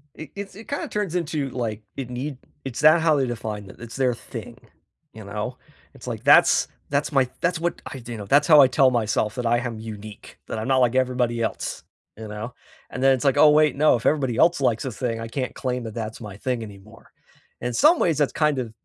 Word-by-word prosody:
It 155 -2 -10
it's 200 -2 -7
it 220 +2 -12
kinda 285 - -3
turns 205 -5 -3
into, 155 -5 -2
like 115 -4 -4 0.2
it 135 -3 -5
need 130 +3 -5 0.3
it's 130 -3 -5
that 155 +2 +6
how 160 -2 +3
they 135 -2 +1
define 110 -3 -5
it - - -13
it's 120 0 -9
their 130 -2 +1
thing, - - -9 0.6
you 110 -2 -11
know? 105 +5 -5 0.4
It's, - - -13
like, - - -5
that's - - +6 0.2
that's 140 +2 0
my 135 -3 +2
that's 175 -1 0
what 170 +1 -2
I 135 - -7
do 120 0 -8
you - - -6
know, 105 - -7
that's 145 +8 +3
how 155 -3 +8
I 135 - +7
tell 130 +1 +3
myself 110 -1 0
that 125 -2 -4
I 120 +1 +3
am 120 -2 -5
unique, 110 -2 -10
that - - -4
I'm 110 - -4
not 135 0 +3
like 125 -1 +3
everybody 125 -2 0
else, 115 - -3 0.3
you 110 0 -8
know, 105 +4 -6 0.4
and 125 - -5
then 135 0 +6
it's, 130 +1 -2
like, 135 - +3
"Oh, 155 - +7
wait. 150 -2 +4
No. 150 0 +4
If 115 - -5
everybody 135 -6 +1
else 170 0 +3
likes 115 -4 +1
this 130 -6 -6
thing, 115 -3 -2
I 115 - -5
can't 130 +2 -4
claim 125 -2 -3
that 110 -2 -7
that's 110 0 -5
my 105 -3 -8
thing 125 +1 -2
anymore." 105 +1 -14 0.5
In 125 +1 -3
some 310 - +5
ways, 165 -5 +2
that's 145 - +1
kind 150 -4 +1
of, 125 - -3
I - - -16
125 Hz, 240 wpm, -23 LUFS, 115-145 Hz, 0.6 s, how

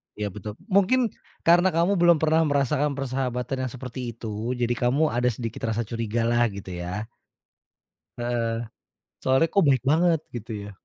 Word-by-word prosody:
Iya, 105 -2 -3
betul. 105 +2 -7 0.2
Mungkin 220 +5 +3 0.3
karena 175 +2 +5
kamu 175 +3 +2
belum 170 -2 +6
pernah 160 +1 +3
merasakan 145 0 +1
persahabatan 130 -1 -2
yang - - -8
seperti 130 0 -7 0.2
itu, 115 +2 -4
jadi 120 -1 0
kamu 130 +6 +1
ada 125 +1 +1
sedikit 115 -1 -3
rasa 115 +1 0
curigalah, 115 +1 0
gitu 95 -2 -8
ya? 90 +6 -5 1.1
Heeh. 115 -1 -1 0.7
Soalnya 130 +5 +4
kok 200 - +4
baik 135 -3 +3
banget 165 0 +3 0.2
gitu 115 0 -6 0.2
ya? - - -8
125 Hz, 150 wpm, -25 LUFS, 115-150 Hz, 1.1 s, belum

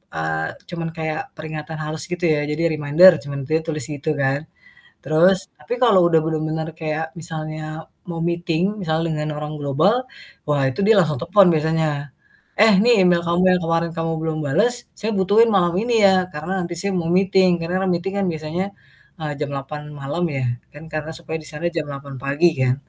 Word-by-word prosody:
eee, 80 0 -1 0.2
cuman 170 -2 -4
kayak 160 0 -2 0.2
peringatan 155 0 -6
halus 155 +1 -2
gitu 175 0 -2
ya. 150 -2 +2
Jadi 150 +2 -2
"Reminder," 155 +5 +7
cuman 140 0 -5
dia 160 +2 +2
tulis 155 -2 -3
gitu 150 +1 -3
kan. 140 +1 0 0.6
Terus 185 +5 +3
tapi 150 +11 -4
kalau 215 -6 +6
udah 165 - +4
bener-bener 160 0 -2
kayak 160 0 -3
misalnya 155 -1 -5 0.2
mau 165 - -4
meeting, 175 +3 0
misalnya 165 -1 0
dengan 150 0 -3
orang 150 0 -5
global, 160 - +2 0.4
wah 145 -2 +1
itu 130 - -7
dia 220 +1 +6
langsung 155 -5 +1
telepon 190 +3 +5
biasanya, 155 -2 0 0.5
"Eh 220 -1 +7
nih 235 -5 +5
email 175 -1 +4
kamu 170 +2 +2
yang 180 - +3
kemarin 165 0 0
kamu 165 0 -1
belum 160 -1 -2
bales, 235 - +1
saya 220 +1 -2
butuhin 205 +5 +4
malam 175 -3 +3
ini 240 +1 -1
ya, 185 -2 +4
karena 155 +5 -5
nanti 175 -1 -4
siang 200 0 -1
mau 165 - -3
meeting." 185 -1 +3
Karena 180 +3 -1
kan 190 - 0
meeting 185 +3 -3 0.2
biasanya, 160 +3 -3 0.6
eee, 155 -2 -3
jam 150 -2 -2
8.00 150 +2 -6
malam 145 +5 -4
ya 135 -2 -2 0.3
kan 145 - -11
karena 155 +1 -3
supaya 160 -1 -5
di 155 - -8
sana 155 +3 -3
jam 160 -3 -2
8.00 140 0 -8
pagi 145 +5 +3
kan. 130 -1 +2
160 Hz, 185 wpm, -21 LUFS, 150-180 Hz, 0.6 s, Reminder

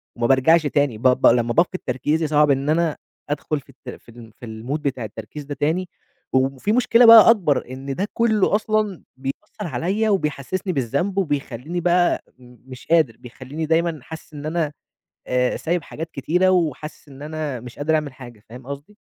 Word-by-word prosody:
وما 120 0 0
بارجعش 155 +5 +4
تاني. 140 -5 0
ب 115 - -14
ب 125 - +4
لمّا 120 0 +3
بافقد 180 +3 +1
تركيزي 150 +5 0
صعب 150 -1 +4
إن 140 +2 0
أنا 160 -1 +1 0.3
أدخل 150 0 -2
في 135 - -22
الت 130 -1 -12
في - - -19
ال 115 -1 -13
في 120 - -9
الmood 115 +7 -5
بتاع 130 -5 -2
التركيز 110 +8 -8
ده 145 0 -6
تاني. 160 +6 -1 0.4
وفي 135 +8 +1
مشكلة 240 0 +4
بقى 230 -1 +10
أكبر، 170 - +2
إن 135 +1 -5
ده 195 +3 -2
كُلّه 220 -3 +2
أصلًا 215 -3 -1
بيأثّر 140 +9 -6
عليَّ 190 - -1
وبيحسِّسني 185 +1 -1
بالذنب، 140 - -1
وبيخلّيني 145 -1 -2
بقى 175 0 +2 0.2
مش 125 +1 -14
قادر، 155 -9 +3
بيخلّيني 130 +6 -7
دايمًا 165 0 +1
حاسس 160 -1 -11
إن 145 0 -8
أنا، 155 -2 -1 0.5
آآ، 125 0 +1
سايب 170 +1 -1
حاجات 160 +2 -7
كتيرة 180 +7 +1
وحاسس 155 -4 -1
إن 135 +1 -13
أنا 150 -4 -4
مش 125 +1 -11
قادر 155 +2 +1
أعمل 150 -4 -2
حاجة، 120 -5 -13
فاهم 125 +2 -11
قصدي؟ 140 +9 -8
150 Hz, 175 wpm, -22 LUFS, 130-175 Hz, 0.5 s, بقى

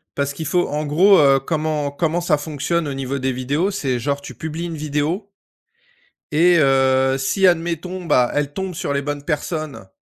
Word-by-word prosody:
Parce 140 0 -1
qu'il 160 +3 -6
faut 175 +4 +1
en 150 +1 -3
gros, 185 +7 +5
heu, 135 -2 +5
comment 155 0 -2
comment 165 +4 -1
ça 160 -4 +2
fonctionne 155 +2 -2
au 140 - -3
niveau 135 0 -3
des 130 0 -1
vidéos? 140 +10 -1
C'est, 135 -10 -1
genre, 140 +3 -2
tu - - -10
publies 160 +2 -5
une 170 -1 -5
vidéo 155 +7 -2 1.0
et 175 +3 +5
heu, 135 -1 +3
si 165 +9 +1
admettons, 175 +1 0
bah, 125 -7 +3
elle 145 0 -1
tombe 190 -1 -4
sur 145 - -3
les 140 - 0
bonnes 145 0 -4
personnes 155 - -4
150 Hz, 185 wpm, -20 LUFS, 140-170 Hz, 1.0 s, gros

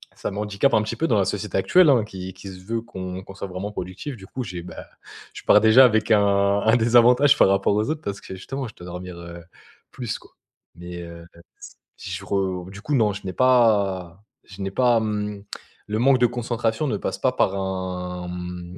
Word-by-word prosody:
ça - - -4
m'handicape 105 +6 0
un 110 - +3
petit 105 - -4
peu 165 - -1
dans 110 - +2
la 95 - +2
société 105 -1 -3
actuelle, 175 - +5
hein 120 -6 +4
qui 95 -2 -8
qui 100 - -12
se 90 -1 -11
veut 115 +1 -2
qu'on 95 -3 -7
qu'on 95 - -11
soit 100 - -6
vraiment 95 +3 -5
productif. 95 +9 -6
Du 95 -3 -13
coup, 130 - -5
j'ai, 90 -4 -6
bah, - - -9 0.5
je - - -9
pars - - +6
déjà 115 +4 +7
avec 110 -1 +2
un 105 -1 +5 0.4
un 110 +2 +4
désavantage 120 +4 +5
par - - +5
rapport 100 +1 +2
aux 105 +6 0
autres 155 0 -2
parce 100 0 -5
que 95 - -8
justement, 135 +7 -5
je 110 - -13
dois 90 - -12
dormir, 90 0 -7
heu, 85 0 -9 0.5
plus 120 -4 -4
quoi - - -20 0.4
mais, 85 0 -8
heu, 85 0 -10 0.7
si - - -8
je - - -5
re 95 -2 -1
du 100 +1 -10
coup 150 - -3
non, 110 -4 +3
je 100 - -9
n'ai 95 - -4
pas 100 -8 +2 0.2
je 95 0 -11
n'ai 95 0 -3
pas, 120 +2 +3
mmh, 105 -2 -3 0.4
le 105 +1 -2
manque 130 +1 +4
de 120 - +5
concentration 120 +2 -2
ne 105 -5 -1
passe - - -4
pas - - +1
par 95 - +1
un, 90 -2 -4
mmh, 90 0 -7
100 Hz, 215 wpm, -23 LUFS, 95-115 Hz, 0.7 s, déjà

